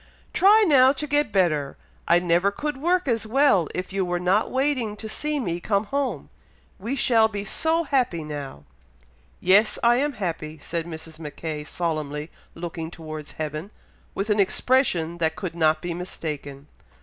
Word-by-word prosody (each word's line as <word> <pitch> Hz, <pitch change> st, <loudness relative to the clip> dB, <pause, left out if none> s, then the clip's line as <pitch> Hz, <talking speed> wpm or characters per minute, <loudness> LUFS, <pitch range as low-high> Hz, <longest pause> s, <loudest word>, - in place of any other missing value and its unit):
"Try 420 Hz, +3 st, +6 dB
now 265 Hz, -5 st, +6 dB
to 290 Hz, +2 st, -4 dB
get 290 Hz, -5 st, +1 dB
better! 155 Hz, -8 st, +1 dB, 0.3 s
I 170 Hz, -, +6 dB
never 175 Hz, +2 st, +2 dB
could 295 Hz, +8 st, -4 dB
work 350 Hz, +4 st, +1 dB
as 230 Hz, -3 st, 0 dB
well, 230 Hz, -, +3 dB
if 185 Hz, +1 st, -4 dB
you 195 Hz, -1 st, +1 dB
were 175 Hz, -1 st, -1 dB
not 185 Hz, +4 st, +2 dB
waiting 260 Hz, -5 st, 0 dB
to 220 Hz, -, -6 dB
see 300 Hz, +6 st, -2 dB
me 175 Hz, -9 st, -2 dB
come 200 Hz, +2 st, 0 dB
home! 275 Hz, +5 st, -3 dB, 0.5 s
We 230 Hz, +8 st, -3 dB
shall 230 Hz, -4 st, +4 dB
be 205 Hz, -2 st, -5 dB
so 320 Hz, +9 st, +1 dB
happy 250 Hz, -, 0 dB
now!" 145 Hz, -, -7 dB, 0.8 s
"Yes! 200 Hz, +4 st, +4 dB
I 240 Hz, +1 st, +5 dB
am 290 Hz, +2 st, 0 dB
happy!" 160 Hz, -7 st, -4 dB
said 165 Hz, +2 st, -4 dB
Mrs. 160 Hz, -1 st, -9 dB
Mackay, 150 Hz, 0 st, -6 dB
solemnly 155 Hz, -2 st, -3 dB, 0.2 s
looking 165 Hz, -1 st, -5 dB
towards 155 Hz, -3 st, -8 dB
heaven, 155 Hz, +4 st, -5 dB, 0.5 s
with 205 Hz, +2 st, -1 dB
an 210 Hz, -, +2 dB
expression 185 Hz, -6 st, +2 dB
that 160 Hz, -1 st, +1 dB
could 180 Hz, -3 st, -5 dB
not 160 Hz, 0 st, +2 dB
be 175 Hz, -1 st, -2 dB
mistaken. 150 Hz, -5 st, -6 dB
185 Hz, 160 wpm, -24 LUFS, 160-255 Hz, 0.8 s, Try